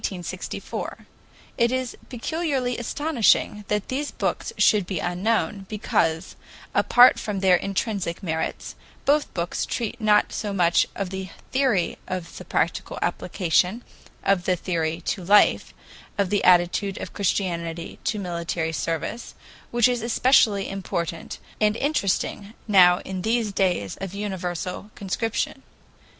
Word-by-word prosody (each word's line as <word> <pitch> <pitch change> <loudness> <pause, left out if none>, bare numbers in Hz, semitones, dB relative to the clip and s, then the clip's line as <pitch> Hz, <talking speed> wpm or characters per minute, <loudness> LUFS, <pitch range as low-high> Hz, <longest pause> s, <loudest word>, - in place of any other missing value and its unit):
It 235 0 +4
is 255 -1 -2
particularly 270 -1 -1
astonishing 240 -5 +1
that 210 -1 -1
these 285 +3 -2
books - - -2
should 205 -4 +4
be 190 - -2
unknown, 195 +3 -1
because, 165 -6 0 0.4
apart 245 +1 +6
from 210 -3 -3
their 190 -2 +6
intrinsic 195 -2 -2
merits, 160 -3 -3 0.3
both 295 +1 +2
books 170 -1 -2
treat 235 0 -3
not 210 -1 +3
so 205 -2 -3
much 175 -3 +3
of 195 -2 -3
the 190 -1 -5 0.2
theory 255 -9 +1
as 185 -2 -3
of 165 - -13
the - - -9
practical - - -1
application 180 +5 0 0.4
of 190 -2 +2
the 185 - +2
theory 165 -2 -2
to 180 +2 -3
life, 205 +4 +4 0.5
of 200 -3 0
the 205 - +1
attitude 180 +2 +3
of - - -7
Christianity 170 -4 -2
to 215 - 0
military 170 -3 -2
service, 165 +9 -3 0.3
which 240 -1 +4
is 245 -2 0
especially 225 -3 +3
important 170 -4 -4 0.2
and 215 +1 +2
interesting 215 -6 -1
now 180 -3 +6
in 190 -1 -5
these 225 +1 0
clays 180 - 0
of 195 0 -6
universal 190 -1 -4
conscription. 215 +3 -2
195 Hz, 130 wpm, -24 LUFS, 180-225 Hz, 0.5 s, apart